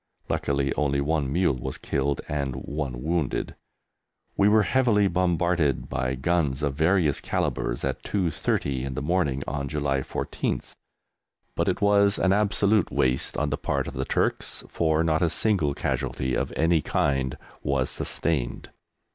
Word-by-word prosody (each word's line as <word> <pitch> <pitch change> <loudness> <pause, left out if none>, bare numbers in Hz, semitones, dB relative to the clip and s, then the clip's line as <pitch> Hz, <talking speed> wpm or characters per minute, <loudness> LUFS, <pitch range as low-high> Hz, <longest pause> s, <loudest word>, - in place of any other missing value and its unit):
Luckily 70 -1 0
only 70 -2 0
one 70 -1 0
mule 85 -5 +2
was - - -4
killed 70 0 -1
and 70 -4 -2
one 65 -2 -4
wounded. 80 -3 -1 0.8
We 100 +1 +4
were 105 0 +5
heavily 115 -5 +3
bombarded 85 -5 +1
by 65 +1 -1
guns 75 -1 0
of 70 -2 +1
various 80 0 +2
calibres - - -1
at - - -2
2.30 80 -8 -1
in 65 -1 -4
the - - -3
morning 75 -5 0
on 70 0 -3
July 70 -1 0
14th, 65 - -3 0.8
but - - -1
it - - 0
was 100 0 +4
an 95 - +3
absolute 105 -1 +2
waste 65 0 0
on 75 -1 0
the 70 - 0
part - - -1
of - - -6
the 65 - -2
Turks, - - -1
for 80 -1 +1
not 80 -1 +1
a 85 - +3
single 85 -6 +1
casualty 65 0 -2
of - - -1
any 80 0 +3
kind 70 -2 0 0.2
was 70 -2 0
sustained. 75 -8 -2
75 Hz, 150 wpm, -26 LUFS, 70-90 Hz, 0.8 s, were